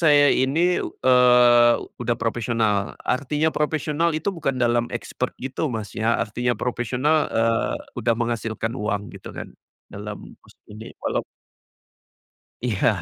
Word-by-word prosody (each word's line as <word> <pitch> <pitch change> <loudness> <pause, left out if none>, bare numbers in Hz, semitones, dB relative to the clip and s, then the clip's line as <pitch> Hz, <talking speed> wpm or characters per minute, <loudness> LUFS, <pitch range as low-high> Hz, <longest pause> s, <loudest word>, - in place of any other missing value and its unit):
saya 145 -3 +6
ini, 135 +4 +1 0.2
eee, 125 -2 +5 0.3
udah 120 -1 0
profesional, 115 -3 0
artinya 145 +4 0
profesional 155 +2 0
itu 155 +5 -2
bukan 160 -7 -2
dalam 120 0 +2
expert 125 +1 -3
gitu 135 +4 -2
Mas 110 -3 -4
ya 115 +1 +2
artinya 120 +2 -1
profesional, 125 +6 0 0.2
eee, 115 0 +1 0.2
udah 115 +1 +1
menghasilkan 115 -1 -2
uang 105 -1 -1 0.2
gitu - - -10
kan - - -7 0.4
dalam 105 +1 -7 0.2
musik - - -23
ini 110 +2 -10
walau - - 0 1.5
Iya 115 -4 +1
120 Hz, 125 wpm, -23 LUFS, 115-135 Hz, 1.5 s, saya